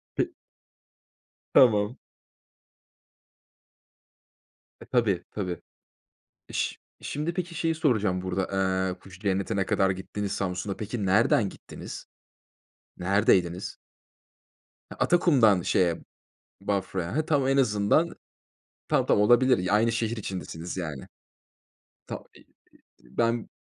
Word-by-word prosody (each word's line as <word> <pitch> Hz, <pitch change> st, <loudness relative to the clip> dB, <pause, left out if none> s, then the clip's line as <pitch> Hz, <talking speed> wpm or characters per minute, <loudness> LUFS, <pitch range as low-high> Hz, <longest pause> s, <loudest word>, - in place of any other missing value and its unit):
Pe -, -, 0 dB, 1.2 s
Tamam. 110 Hz, -1 st, +5 dB, 2.8 s
E, -, -, -12 dB
tabii, 105 Hz, -8 st, +1 dB
tabii. 90 Hz, -4 st, -4 dB, 0.9 s
İş -, -, -2 dB, 0.2 s
şimdi, 155 Hz, +4 st, -3 dB
peki, 175 Hz, -1 st, -4 dB
şeyi 165 Hz, 0 st, 0 dB
soracağım 105 Hz, -, +1 dB
burada. 95 Hz, 0 st, -2 dB, 0.5 s
Eee, 90 Hz, -, -15 dB
Kuş 95 Hz, -1 st, -14 dB
Cenneti'ne 95 Hz, -1 st, 0 dB
kadar 95 Hz, 0 st, +2 dB
gittiniz, 95 Hz, +2 st, -4 dB
Samsun'a. 95 Hz, +1 st, -2 dB
Peki, 110 Hz, 0 st, -3 dB
nereden 100 Hz, +1 st, +3 dB
gittiniz? -, -, -9 dB, 0.9 s
Neredeydiniz? 90 Hz, -1 st, +1 dB, 1.1 s
Atakum'dan 130 Hz, -, +4 dB
şeye, 85 Hz, -1 st, +1 dB, 0.6 s
Bafra'ya. 95 Hz, -1 st, -2 dB
He, 155 Hz, 0 st, +1 dB
tamam 145 Hz, -5 st, +2 dB
en 135 Hz, 0 st, +2 dB
azından 125 Hz, +7 st, +2 dB, 0.7 s
tamam, -, -, +2 dB
tamam, 105 Hz, -, +3 dB
olabilir. 120 Hz, -4 st, +4 dB
Aynı 115 Hz, +2 st, +3 dB
şehir 115 Hz, 0 st, -1 dB
içindesiniz 90 Hz, -4 st, -6 dB
yani. 75 Hz, -7 st, -5 dB, 1.0 s
Tamam, -, -, -6 dB
i -, -, -15 dB, 0.8 s
ben 115 Hz, 0 st, +1 dB
105 Hz, 95 wpm, -27 LUFS, 95-120 Hz, 2.8 s, Tamam